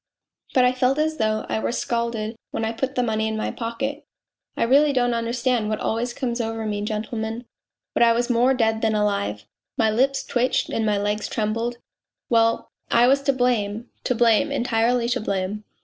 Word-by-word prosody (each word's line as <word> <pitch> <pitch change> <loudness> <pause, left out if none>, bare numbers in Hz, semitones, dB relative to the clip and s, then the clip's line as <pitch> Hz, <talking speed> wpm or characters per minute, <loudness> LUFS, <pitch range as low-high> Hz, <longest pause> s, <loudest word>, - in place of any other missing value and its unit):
But 255 -1 +5
I 250 - +4
felt 255 +2 +1
as 310 +1 0
though 215 -1 0
I 110 - -1
were 115 +1 -1
scalded 235 - -2
when 225 - -2
I 220 - -1
put 265 +4 -3
the 250 - +2
money 220 -1 0
in 220 0 -2
my 215 - -2
pocket. 270 +6 -4 0.5
I - - +2
really 280 +5 +4
don't 245 -2 +2
understand 235 -1 0
what 215 - -1
always 235 +2 -1
comes 240 -1 -2
over 225 -1 -3
me, 205 -1 -2
gentlemen 220 +2 -3 0.5
but - - 0
I 235 0 +6
was 240 +1 +1
more 250 +2 +3
dead 225 -2 +1
than 220 -1 +1
alive, 155 - -1 0.3
my 220 -1 +3
lips 270 +5 +1
twitched 250 +1 0
and 220 -1 -1
my 210 -1 +2
legs 205 +1 -1
trembled; 230 +2 -2 0.5
well, 230 -1 +2 0.2
I 235 +1 +5
was 275 +2 +4
to 275 - +2
blame, 240 -3 -1
to 250 - +1
blame, 235 +5 +3
entirely 240 -2 +1
to 250 -1 0
blame. 200 +1 -2
230 Hz, 190 wpm, -23 LUFS, 215-250 Hz, 0.5 s, I